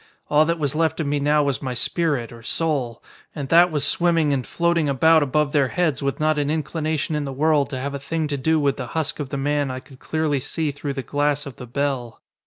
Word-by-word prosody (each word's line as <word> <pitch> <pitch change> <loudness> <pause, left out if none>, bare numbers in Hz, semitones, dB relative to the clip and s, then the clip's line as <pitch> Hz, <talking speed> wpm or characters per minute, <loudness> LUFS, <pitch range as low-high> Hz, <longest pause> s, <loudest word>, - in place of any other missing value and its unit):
All 150 +1 +5
that 170 +1 0
was 145 -4 -1
left 160 0 0
of 160 - -1
me 145 +1 0
now 150 +1 +3
was 140 -2 -1
my 130 -2 -3
spirit, 140 -1 0
or 115 -1 -11
soul. 135 -3 -1 0.3
And 140 -3 -5
that 170 +2 +6
was 150 -2 +1
swimming 165 -2 +2
and 130 -3 -2
floating 170 -3 +1
about 160 +4 +4
above 145 +1 +1
their 145 -3 +3
heads 155 -3 0
with 140 -1 -2
not 155 0 +2
an 145 0 0
inclination 155 0 -2
in 150 -1 -1
the 135 - -4
world 145 0 +2
to 135 - -4
have 140 +2 -4
a 140 - -4
thing 160 +2 -2
to 145 - -1
do 160 +4 +2
with 140 -2 +1
the 125 - -5
husk 155 -1 -1
of 145 -3 -4
the 140 - -3
man 145 0 0
I 130 0 -4
could 130 0 -17
clearly 155 -2 -1
see 155 +3 -2
through 145 0 -5
the 135 -1 -4
glass 145 +1 0
of 140 -4 -9
the 125 - -9
bell. 130 -2 -2
145 Hz, 245 wpm, -22 LUFS, 135-155 Hz, 0.3 s, that